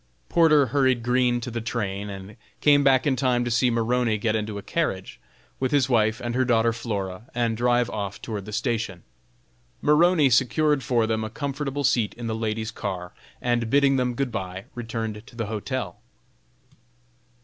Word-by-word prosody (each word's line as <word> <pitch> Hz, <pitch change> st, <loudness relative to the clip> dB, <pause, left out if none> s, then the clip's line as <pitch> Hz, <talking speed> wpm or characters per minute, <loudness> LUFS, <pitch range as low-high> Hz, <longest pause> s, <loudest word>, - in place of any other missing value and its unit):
Porter 155 Hz, -4 st, +5 dB
hurried 130 Hz, -4 st, +2 dB
Green 125 Hz, 0 st, +2 dB
to 120 Hz, -, -5 dB
the 115 Hz, 0 st, -3 dB
train, 105 Hz, -3 st, -3 dB
and 95 Hz, +1 st, -9 dB, 0.2 s
came 145 Hz, -1 st, +5 dB
back 135 Hz, -2 st, +4 dB
in 140 Hz, -3 st, +2 dB
time 125 Hz, -2 st, +1 dB
to 120 Hz, -, -2 dB
see 125 Hz, +2 st, +3 dB
Maroney 115 Hz, -1 st, +1 dB
get 110 Hz, +1 st, 0 dB
into 105 Hz, -1 st, -3 dB
a 100 Hz, -, -7 dB
carriage, 95 Hz, -, -2 dB, 0.4 s
with 130 Hz, -, 0 dB
his 140 Hz, -2 st, +2 dB
wife 110 Hz, -2 st, +2 dB
and 120 Hz, -1 st, -3 dB
her 130 Hz, +1 st, +2 dB
daughter 115 Hz, -2 st, +2 dB
Flora, 105 Hz, -2 st, -5 dB
and 115 Hz, -2 st, 0 dB
drive 120 Hz, +1 st, +2 dB
off 100 Hz, -2 st, -5 dB
toward 105 Hz, -4 st, -5 dB
the 105 Hz, -, -8 dB
station. 110 Hz, -5 st, -2 dB, 0.8 s
Maroney 150 Hz, -1 st, +4 dB
secured 145 Hz, +4 st, +3 dB
for 120 Hz, -3 st, +1 dB
them 110 Hz, 0 st, -1 dB
a 110 Hz, -, -4 dB
comfortable 140 Hz, +2 st, -3 dB
seat 120 Hz, -5 st, +1 dB
in 120 Hz, -, -7 dB
the 115 Hz, -, -2 dB
ladies' 110 Hz, 0 st, -2 dB
car, 90 Hz, -4 st, -5 dB, 0.3 s
and, 120 Hz, -2 st, 0 dB
bidding 140 Hz, +1 st, +4 dB
them 125 Hz, -1 st, 0 dB
good 135 Hz, 0 st, -1 dB
bye, 95 Hz, -2 st, -5 dB
returned 110 Hz, -3 st, -4 dB
to 120 Hz, -, -15 dB
the 115 Hz, -1 st, -3 dB
hotel. 110 Hz, +5 st, -4 dB
120 Hz, 175 wpm, -25 LUFS, 110-130 Hz, 0.8 s, Porter